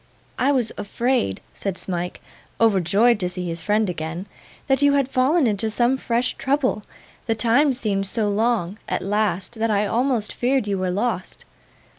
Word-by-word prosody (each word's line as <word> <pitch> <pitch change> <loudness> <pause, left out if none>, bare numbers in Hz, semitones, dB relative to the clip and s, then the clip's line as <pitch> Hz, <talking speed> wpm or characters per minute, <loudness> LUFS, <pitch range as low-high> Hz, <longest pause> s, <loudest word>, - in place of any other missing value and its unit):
'I 275 +3 +3
was 245 -5 +1
afraid,' 235 - -1
said 195 -2 -4
Smike, 180 -1 -4 0.4
overjoyed 210 +2 +3
to 180 - -1
see 180 0 -5
his 165 0 -4
friend 210 +3 +1
again, 170 +1 -4 0.4
'that 270 0 +1
you 285 0 +5
had 280 -2 +2
fallen 270 +4 +2
into 220 0 0
some 240 +4 +2
fresh 245 -1 -1
trouble; 265 -5 0 0.5
the 225 - +1
time 245 +6 +3
seemed 205 -6 -1
so 215 +1 0
long, 210 -2 0
at - - -1
last, 210 +2 -1
that 225 +1 +1
I 210 -1 +2
almost 235 0 +1
feared 260 -1 +1
you 200 -2 -1
were 185 0 -1
lost. 200 +1 -3
220 Hz, 165 wpm, -22 LUFS, 195-250 Hz, 0.5 s, you